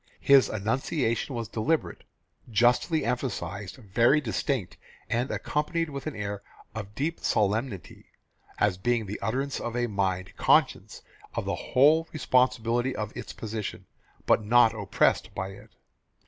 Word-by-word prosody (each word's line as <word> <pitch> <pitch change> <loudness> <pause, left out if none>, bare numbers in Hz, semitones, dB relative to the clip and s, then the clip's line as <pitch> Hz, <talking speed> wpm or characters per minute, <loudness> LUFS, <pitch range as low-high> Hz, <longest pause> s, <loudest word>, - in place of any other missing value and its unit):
His 140 -1 +5
enunciation 115 - -1
was 115 -2 -3
deliberate, 130 +9 -1 0.5
justly 120 +8 +2
emphasised, 105 -6 -3
very 120 +5 +3
distinct, 125 - -2 0.3
and 120 +3 0
accompanied 155 +2 -1
with 140 +1 -6
an 155 - -4
air 100 -1 -4 0.3
of 105 -2 -7
deep 155 +6 -2
solemnity 105 0 -1 0.5
as 100 -3 +1
being 120 +2 +1
the 105 +2 -6
utterance 135 +5 -2
of 120 0 -4
a 120 - +1
mind 95 -4 -2
conscious - - +2 0.3
of - - -2
the - - -1
whole 155 +5 +3
responsibility 125 -3 +1
of 105 -1 -5
its - - -6
position, 110 -1 -5 0.4
but - - +3
not 115 +1 +5
oppressed 105 -3 +1
by 95 0 -3
it. 100 +3 -13
115 Hz, 135 wpm, -27 LUFS, 105-135 Hz, 0.5 s, His